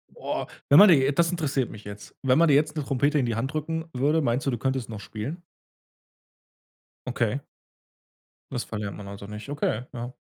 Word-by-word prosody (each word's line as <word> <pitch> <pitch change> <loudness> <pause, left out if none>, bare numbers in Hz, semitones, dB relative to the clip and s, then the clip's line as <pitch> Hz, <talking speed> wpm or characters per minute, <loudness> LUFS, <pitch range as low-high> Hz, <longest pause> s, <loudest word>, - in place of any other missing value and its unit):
Oh, - - -3 0.2
wenn 145 - +9
man 205 -1 +10
dir 165 - +8
j 135 +1 +3
das 170 0 +3
interessiert 145 -7 -1
mich 105 - -10
jetzt, 100 0 -10
wenn 130 +1 +4
man 170 0 +5
dir 140 - +5
jetzt 150 +1 +2
'ne 150 - -2
Trompete 140 +3 +1
in 130 - +1
die 115 -2 -1
Hand 130 +6 -2
drücken 160 +1 -2
würde, 145 +5 +2
meinst 125 +1 0
du, 135 - +1
du 120 - -1
könntest 130 -1 -2
noch 110 -2 -6
spielen? 125 - -6 1.7
Okay. 120 0 0 1.1
Das 120 - -2
verlernt 105 -2 -5
man 100 -1 -9
also 100 0 -8
nicht. 105 +4 -8
Okay. 125 -5 -1
Ja. 120 +1 -5
130 Hz, 200 wpm, -26 LUFS, 115-150 Hz, 1.7 s, man